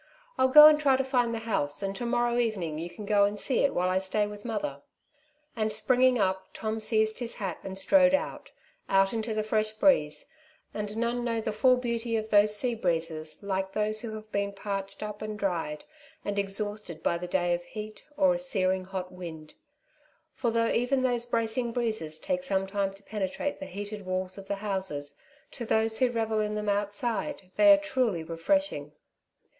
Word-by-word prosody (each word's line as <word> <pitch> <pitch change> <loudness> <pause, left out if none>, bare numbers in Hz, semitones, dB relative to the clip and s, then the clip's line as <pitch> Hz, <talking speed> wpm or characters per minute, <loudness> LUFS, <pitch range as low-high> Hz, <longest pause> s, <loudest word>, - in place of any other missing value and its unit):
I'll 260 - +3
go 300 +3 +10
and 305 0 +8
try 275 -3 +4
to 265 - +1
find 250 -3 +1
the 230 - -2
house, 145 -6 -1
and 195 0 -2
to 240 +4 -3
morrow 240 0 +1
evening 190 -10 -1
you 170 +2 -5
can 210 +3 -9
go 200 0 +4
and 205 +1 -2
see 260 - +1
it 280 - +3
while 180 +1 +1
I 185 +1 +2
stay 200 +2 0
with 205 0 -8
mother." 205 -12 -3 0.7
And 215 -2 0
springing 250 +4 +3
up, 190 -2 0
Tom 220 0 -3
seized 220 0 +1
his 240 -2 -4
hat 190 -5 -4
and 190 0 -7
strode 275 +7 +5
out - - -4 0.2
— - - -38
out 195 +1 +3
into 225 -1 -2
the 215 - 0
fresh 215 0 0
breeze; 215 - +2 0.5
and 210 0 -4
none 235 +1 -1
know 230 -1 -1
the 220 - -2
full 255 +4 +4
beauty 235 -2 -1
of 220 0 -4
those 210 0 +6
sea 240 +3 +1
breezes 165 -5 -2
like 190 -1 -2
those 215 0 -1
who 225 -2 -5
have 215 0 -10
been 200 0 -1
parched 195 0 -5
up, 210 0 -6
and 215 0 -4
dried 170 -7 -2 0.4
and 205 0 -1
exhausted 200 -4 -4
by 170 - +1
a 180 +1 -6
day 175 -1 +1
of 175 0 -2
heat, 215 +3 -8
or 285 -2 +4
a 265 - -2
searing 190 -8 0
hot 185 -1 -5
wind; 165 -4 -9 0.8
for 245 -3 -1
though 230 0 +1
even 255 +2 +1
those 245 -2 +1
bracing 230 +1 0
breezes 215 -11 -1
take 275 - -2
some 195 -7 0
time 195 0 -1
to 200 - -18
pene 200 -2 -3
trate 290 +9 -4
the - - -6
heated 205 +2 -6
walls 185 0 -2
of 195 - -11
the 200 - -1
houses, 190 -8 -2 0.4
to 245 - -6
those 220 0 +1
who 255 -1 +4
revel 225 -2 -1
in 210 0 -1
them 210 0 -2
outside 205 +2 -2
they 310 -1 +7
are 300 - +8
truly 255 - -1
refreshing. 165 - -1
215 Hz, 200 wpm, -28 LUFS, 190-235 Hz, 0.8 s, go